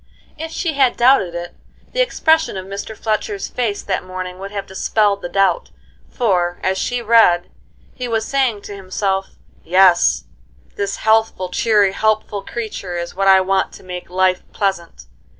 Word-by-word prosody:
If 320 +1 -6
she 325 0 -2
had 270 -3 +2
doubted 240 -9 +4
it, 175 0 -6 0.4
the - - +2
expression 320 - +2
of 185 - -6
Mr. 200 +3 -7
Fletcher's 310 - -2
face 225 -5 -2
that 190 -2 -2
morning 185 0 -6
would 195 +1 -6
have 200 -1 -5
dispelled 200 +1 0
the 175 - -5
doubt, 195 - +1 0.4
for, 180 -7 0
as 190 0 0
she 245 -1 -2
read, 210 -6 +4 0.4
he 250 -1 -5
was 225 -1 -1
saying 255 -7 0
to 205 - -8
himself: 195 0 -2 0.3
"Yes, 180 0 +4 0.5
this 200 0 -2
healthful, 220 -4 +1
cheery, 205 +1 +3
helpful 215 0 0
creature 195 -5 -5
is 170 0 -5
what 195 +1 0
I 190 -1 +7
want 190 0 0
to - - -13
make 180 -1 -7
life 185 0 +2
pleasant. 175 - -3
200 Hz, 160 wpm, -19 LUFS, 185-225 Hz, 0.5 s, I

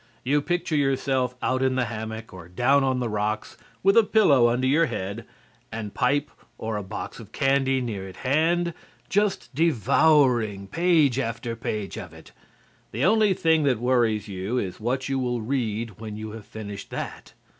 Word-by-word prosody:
You 145 +3 +2
picture 175 0 -1
yourself 135 -3 +1
out 130 0 +1
in 130 -1 +2
the 130 -1 +1
hammock 110 0 -6
or 90 -2 -10
down 130 +9 +3
on 130 -1 +1
the 125 - -1
rocks, 105 0 -2 0.3
with 195 +1 +5
a 230 - +7
pillow 150 - +4
under 125 +2 0
your 155 +5 +3
head 100 +2 -5 0.4
and 110 -2 -5
pipe 145 +3 +1 0.3
or 110 0 -3
a 105 - -2
box 95 - -7
of - - -12
candy 135 -1 +2
near 105 -6 -4
at 95 - -11
hand, 165 +5 +1 0.4
just 205 -6 0
devouring 125 - +3
page 155 - +2
after 115 -1 -3
page 105 -3 -4
of - - -9
it. - - -15 0.6
The 120 +7 0
only 210 -1 +4
thing 160 -2 +3
that 130 -4 +2
worries 115 -3 +1
you 100 +5 -3
is 95 -7 -3
what 130 +4 -1
you 135 -1 -1
will 120 -2 -1
read 115 -4 -2
when 110 -1 -6
you 110 0 -6
have 110 -1 -10
finished 105 -2 -8
that. - - -6
125 Hz, 175 wpm, -25 LUFS, 110-140 Hz, 0.6 s, a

